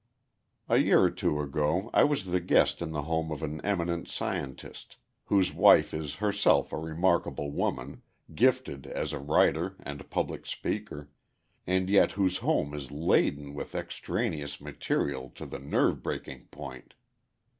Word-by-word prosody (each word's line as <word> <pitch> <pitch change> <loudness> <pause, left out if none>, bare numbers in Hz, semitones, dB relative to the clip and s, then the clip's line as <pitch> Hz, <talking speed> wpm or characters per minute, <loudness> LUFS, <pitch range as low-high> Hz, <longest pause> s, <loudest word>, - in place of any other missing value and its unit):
A - - +3
year - - +5
or - - +4
two 75 - -1
ago 75 - -1
I - - +6
was 145 -9 0
the 90 - +2
guest 90 0 +3
in 85 -2 -3
the 75 -2 -3
home 80 +1 -1
of 75 - -5
an 75 +1 -4
eminent 85 -4 -1
scientist, 65 -2 -5 0.3
whose 95 -3 +2
wife - - +6
is 75 -2 -4
herself 100 +1 +2
a - - -1
remarkable 80 -2 0
woman, 65 -1 -3 0.3
gifted 130 - +1
as 75 - -3
a 75 - -3
writer 80 +5 +2
and 70 0 -8
public - - -3
speaker, 75 0 -4 0.6
and 95 +1 +1
yet 100 0 +4
whose 95 -2 +1
home 75 - 0
is 70 -3 -6
laden 70 -1 +1
with 75 - -7
extraneous 70 -2 -3
material 65 -2 -2
to - - -8
the - - -7
nerve - - +1
breaking 65 -2 -5
point. - - -10
80 Hz, 150 wpm, -29 LUFS, 70-95 Hz, 0.6 s, I